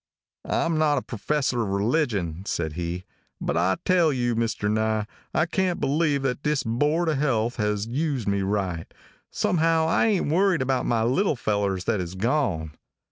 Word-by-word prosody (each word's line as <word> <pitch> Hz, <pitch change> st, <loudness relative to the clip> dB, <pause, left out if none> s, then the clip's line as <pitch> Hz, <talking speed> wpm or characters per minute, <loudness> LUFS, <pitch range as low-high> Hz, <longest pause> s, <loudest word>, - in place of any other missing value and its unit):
"I -, -, +1 dB
am 165 Hz, -2 st, 0 dB
not 150 Hz, -2 st, +3 dB
a 130 Hz, -, -1 dB
professor 130 Hz, +2 st, -1 dB
of 110 Hz, -, -1 dB
religion," 100 Hz, -, 0 dB
said 80 Hz, -2 st, -2 dB
he, 85 Hz, +2 st, -4 dB, 0.4 s
"but -, -, -2 dB
I 90 Hz, +3 st, +2 dB
tell 175 Hz, -4 st, +4 dB
you, 120 Hz, -3 st, 0 dB
Mr. 115 Hz, -2 st, -1 dB
Nye, 110 Hz, 0 st, +1 dB, 0.3 s
I -, -, +2 dB
can't 180 Hz, +1 st, 0 dB
believe 145 Hz, -1 st, +1 dB
that 135 Hz, 0 st, -1 dB
this 150 Hz, -2 st, 0 dB
board 150 Hz, +9 st, +1 dB
of 155 Hz, -4 st, +1 dB
health 120 Hz, -5 st, 0 dB
has 105 Hz, -2 st, 0 dB
used 135 Hz, -1 st, -2 dB
me 100 Hz, 0 st, +1 dB
right. 95 Hz, -4 st, -2 dB, 0.4 s
Somehow 165 Hz, -1 st, +2 dB
I 165 Hz, -, +3 dB
ain't 190 Hz, -9 st, +1 dB
worried 185 Hz, -3 st, +3 dB
about 130 Hz, -1 st, 0 dB
my 115 Hz, -2 st, +2 dB
little 145 Hz, -, +2 dB
fellers 100 Hz, -5 st, -1 dB
that 105 Hz, -1 st, 0 dB
is 90 Hz, +1 st, -6 dB
gone. 100 Hz, -, 0 dB
120 Hz, 175 wpm, -25 LUFS, 100-150 Hz, 0.4 s, tell